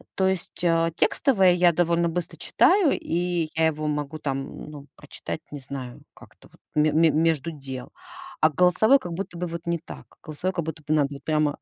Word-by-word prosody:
То 190 - +2
есть, 190 -2 -3
а, 165 -1 +2
текстовые 190 - +3
я 175 -1 +4
довольно 170 0 +2
быстро 170 +1 -4
читаю, 375 -7 +3
и 170 -1 -1
я 160 0 +2
его 155 -1 -2
могу 150 +1 -3
там, 135 0 -5
ну, 145 -2 -11
прочитать, - - -7
не 145 - -6
знаю, 130 -2 -8
как-то - - -18
вот - - -24 0.2
ме 150 0 +3
ме 165 +1 +5
между 160 0 +1
дел. 135 -4 -8 0.5
А 155 - +5
голосовые 180 - +4
как 175 - -7
будто 180 0 -6
бы 180 - -2
вот 170 +1 -7
не 170 - +1
так. 165 - -11 0.2
Голосовые 170 +4 -3
как 170 -2 -2
будто 160 -1 -6
бы 155 - +1
надо 140 -2 0
прямо 150 -2 0
165 Hz, 190 wpm, -25 LUFS, 150-175 Hz, 0.5 s, ме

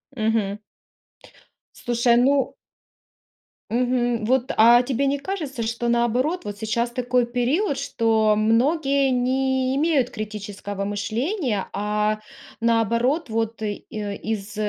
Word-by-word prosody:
Мгм. 215 -3 0 1.2
Слушай, 235 -1 +2
ну. 270 +3 +2 1.1
Мгм. 245 -1 0
Вот, 260 +3 +1
а 235 +2 +7
тебе 265 +2 -1
не 280 +1 +1
кажется, 290 -7 -4
что, 235 +1 -2
наоборот, 245 +9 +1
вот 205 0 -5
сейчас 235 +2 -1
такой 250 0 +1
период, 260 - 0
что 220 -4 +2
многие 275 +5 +2
не 260 +1 +1
имеют 285 -4 +2
критического 205 -3 -6
мышления, 225 - -2
а, 210 +1 0 0.4
наоборот, 235 +6 +1
вот 225 0 -2
и 210 -1 -2
из 210 0 -5
235 Hz, 105 wpm, -23 LUFS, 215-265 Hz, 1.2 s, а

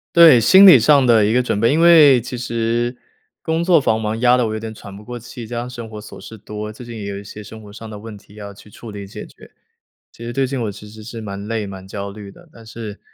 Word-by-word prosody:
对， 165 -7 +8
心 190 - +7
理 180 -9 +9
上 135 +3 +4
的 115 -3 +4
一 105 - +1
个 125 +2 +2
准 125 - -2
备。 115 +4 +2
因 155 - +1
为 155 -6 +6
其 125 +2 -7
实， 120 0 -3 0.4
工 160 +1 -2
作 170 -3 +4
繁忙 110 -3 -2
压 125 0 +4
得 125 -2 0
我 110 - -4
有 110 - -5
点 110 0 -7
喘 100 -2 -12
不 100 - -12
过 120 +3 -8
气， 120 0 -10
加 120 +1 -5
上 125 +1 -7
生 120 -2 -9
活 110 -1 -10
琐 105 - -12
事 110 - -11
多。 105 0 -8
最 110 +3 -12
近 120 0 -10
也 105 - -7
有 100 0 -6
一 100 - -11
些 105 +1 -10
生 110 +2 -12
活 105 -1 -14
上 115 +1 -11
的 105 -1 -9
问 110 0 -10
题 100 - -21
要 100 -1 -10
去 100 - -17
处 110 +2 -12
理 100 -1 -9
解 95 - -10
决。 - - -17 0.6
其 115 - -12
实 120 - -6
最 135 +1 0
近 135 0 -4
我 105 - -3
其 105 +1 -13
实 110 0 -13
是 115 +1 -9
蛮 100 -1 -7
累、 110 -2 -3
蛮 95 -1 -10
焦 100 +1 -6
虑 100 0 -11
的。 - - -20
但 115 - -16
是， 110 -2 -9
115 Hz, 305 characters per minute, -18 LUFS, 105-125 Hz, 0.6 s, 理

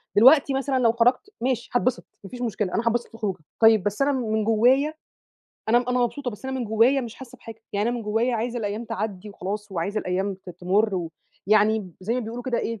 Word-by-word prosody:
دلوقتي 270 +5 +6
مثلًا 270 0 0
لو 235 -2 +4
خرجت 245 - +2
ماشي 245 -1 -1
هاتبسط، 245 0 0 0.2
ما 195 - -9
فيش 250 -1 -8
مشكلة، 210 -5 -2
أنا 230 - 0
هاتبسط 235 +1 +1
في - - -32
الخروجة، 215 -4 -3 0.2
طيّب 220 -3 +6
بس 205 +4 -2
أنا 280 +1 +3
م - - 0 0.2
من 220 0 +1
جوّايا، 250 +7 +3 0.8
أنا 235 +2 +5
أنا 250 0 +1
مبسوطة، 245 +2 -1
بس 210 +3 -12
أنا 265 0 -3
من 245 - -2
جوّايا 230 +5 +3
مش 235 -3 -7
حاسّة 260 -2 -12
بحاجة، 225 0 -11
يعني 205 +3 0
أنا 245 - -1
من 235 - -5
جوّايا 225 +4 0
عايزة 235 +2 -2
الأيّام 210 +1 -3
تعدّي 205 -2 -4
وخلاص، 205 +1 -5
وعايزة 195 +5 -2
الأيّام 190 +2 -1
ت 190 -1 -12
تمر 190 +4 +1
و 170 -3 -3 0.4
يعني 215 -1 +3
زي 215 +6 -1
ما 250 - 0
بيقولوا 235 +1 -6
كده 245 -1 -1
إيه، 230 -2 -3
225 Hz, 225 wpm, -24 LUFS, 205-245 Hz, 0.8 s, دلوقتي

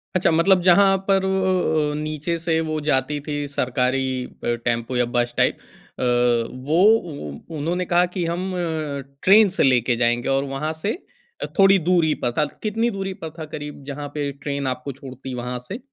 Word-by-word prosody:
अच्छा 180 - +3
मतलब 180 +3 +4
जहाँ 195 +2 +6
पर 195 -1 +3
अ, 185 -5 +1
अ, 150 - -4
नीचे 155 +2 -2
से 165 -1 0
वो 155 0 -1
जाती 145 0 0
थी 145 0 -4 0.2
सरकारी 130 +1 0 0.4
अ, 120 - +1
टेम्पो 120 +1 -1
या 125 - +3
बस 120 0 +1
टाइप - - +2 0.4
अ, - - -1 0.7
वो 160 - +3 0.7
उ 160 - -6
उन्होंने 175 +5 -1
कहा 175 +1 +3
कि 180 -3 -1
हम 180 +3 -2 0.7
ट्रेन 205 +1 +7
से - - +4
लेके 125 -2 +3
जाएँगे 120 +1 +1
और 135 0 +2
वहाँ 155 +3 -2
से 210 - +1 0.5
अ, - - 0
थोड़ी 195 0 +7
दूरी 165 -4 +3
पर 120 - +1
था। 150 - +3 0.2
कितनी 225 +2 0
दूरी 195 0 -3
पर 160 - -3
था 155 - -4
करीब 145 -1 -8
जहाँ 145 +1 -5
पे 145 -2 -2
ट्रेन 140 -1 -2
आपको 125 +2 -3
छोड़ती 130 -1 -8
वहाँ 125 0 -3
से? 220 - -5
155 Hz, 180 wpm, -22 LUFS, 130-180 Hz, 0.7 s, ट्रेन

